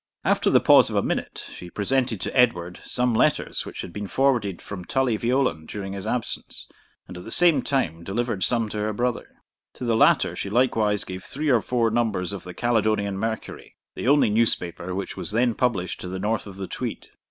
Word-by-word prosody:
After - - +2
the - - +5
pause - - +6
of - - -4
a - - +2
minute, - - -3
she 90 - -10
presented 120 +3 0
to - - -4
Edward 90 -9 +2
some 125 -1 0
letters 110 - +1
which - - -6
had 85 - -9
been 105 -1 -5
forwarded 120 -7 +1
from 100 -3 -8
Tully 130 +3 0
Veolan 120 -9 0
during 100 -2 -6
his 100 -1 -6
absence, 125 -2 -4 0.4
and 90 - -9
at - - -10
the - - -9
same 170 +3 +5
time 85 - -1
delivered 105 +1 -2
some 115 -3 +4
to 105 - -4
her 105 +1 -1
brother. 120 +2 -2 0.4
To 125 - -7
the 115 -1 +2
latter 110 - +4
she 100 - -4
likewise 110 -3 +2
gave 95 0 -7
three 150 +2 -3
or 120 -5 +4
four 115 -1 0
numbers 110 -5 0
of 100 - -7
the 90 - -9
Caledonian 110 -4 0
Mercury, 110 +1 -5 0.2
the - - -5
only 140 -5 +4
newspaper 90 -5 0
which 95 0 -4
was - - -5
then 120 +1 +2
published 110 -7 -1
to - - -6
the 95 +1 -4
north 105 +3 -1
of 100 -1 -10
the 95 - -4
Tweed. - - -6
110 Hz, 205 wpm, -24 LUFS, 95-125 Hz, 0.4 s, pause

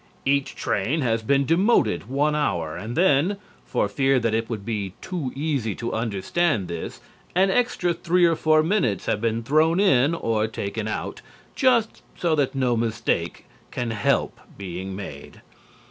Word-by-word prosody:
Each 140 0 +1
train 135 +11 -1
has 115 -3 +1
been 140 +5 +2
demoted 160 - +2
one 145 +3 +1
hour, 85 - -1
and 115 +6 -6
then, 175 +2 +3 0.3
for - - 0
fear 135 +5 +2
that 115 -2 0
it 115 0 -1
would 105 -4 -5
be 105 -4 -3
too 165 -9 -4
easy 135 -8 -1
to 120 - -4
understand 110 - 0
this, 85 -1 -6 0.3
an 190 +1 +4
extra 190 -7 +1
three 175 +1 +2
or 165 -1 +3
four 155 0 +3
minutes 160 - 0
have 105 - 0
been 115 0 0
thrown 155 +7 +3
in 150 -5 +4
or 110 -7 0
taken 110 0 -4
out, 110 - -4 0.3
just, 245 -5 +2 0.2
so 170 -2 +1
that 145 -3 +1
no 125 -3 +1
mistake 115 -1 -1 0.2
can 120 -2 -3
help 105 -2 0 0.2
being 95 0 -6
made. 95 -8 -9
130 Hz, 160 wpm, -24 LUFS, 110-160 Hz, 0.3 s, an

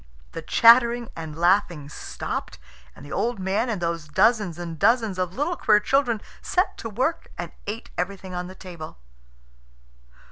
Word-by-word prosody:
The 165 - -6
chattering 235 +5 +5
and 160 -2 -7
laughing 175 -4 +2
stopped, 150 - -5 0.4
and 140 - -12
the 145 - -11
old 240 +1 -1
man 195 +5 0
and 215 -5 -2
those 170 -2 -2
dozens 185 +2 +2
and 170 -2 -6
dozens 225 -5 +2
of 180 0 -2
little 300 +7 0
queer 210 -9 +4
children 240 -1 +1 0.2
set 365 +2 0
to 225 - -5
work 260 +10 -2
and - - -5 0.2
ate 220 +3 -5
everything 185 +1 -4
on 180 0 -4
the 185 - -10
table. 170 - -9
195 Hz, 155 wpm, -24 LUFS, 175-235 Hz, 0.4 s, chattering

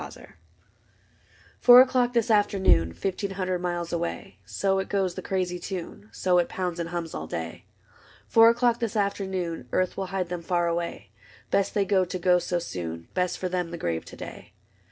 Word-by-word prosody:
CORTEGE - - -11 1.3
Four 245 0 +9
o'clock 250 -1 +2
this 235 -2 +1
afternoon. 190 - +3
Fifteen 195 - -3
hundred 185 -2 -2
miles 175 -1 -3
away: 170 +3 -4
So 195 -1 0
it 190 - -4
goes, 190 -3 0
the - - -6
crazy 180 -2 -2
tune. 190 +3 -7
So 180 -1 +2
it 175 - 0
pounds 180 -2 -3
and 165 -1 -3
hums 170 -2 -4
all 80 - -5
day. 80 0 -6 0.6
Four 225 0 +7
o'clock 235 0 +2
this 230 -2 -2
afternoon, 190 - -2
Earth 185 -1 0
will 195 -1 -2
hide 185 -2 -3
them 175 -1 -4
far 175 0 0
away: 170 - -3 0.4
Best 200 - +1
they 200 -1 +2
go 190 -1 +3
to 185 +1 -4
go 180 0 +3
so 175 0 -2
soon. 85 - -6
Best 180 -1 0
for 185 - -2
them 180 -1 -2
the 170 - -6
grave 85 - -2
to - - -11
day. - - -10
180 Hz, 185 wpm, -26 LUFS, 170-195 Hz, 1.3 s, Four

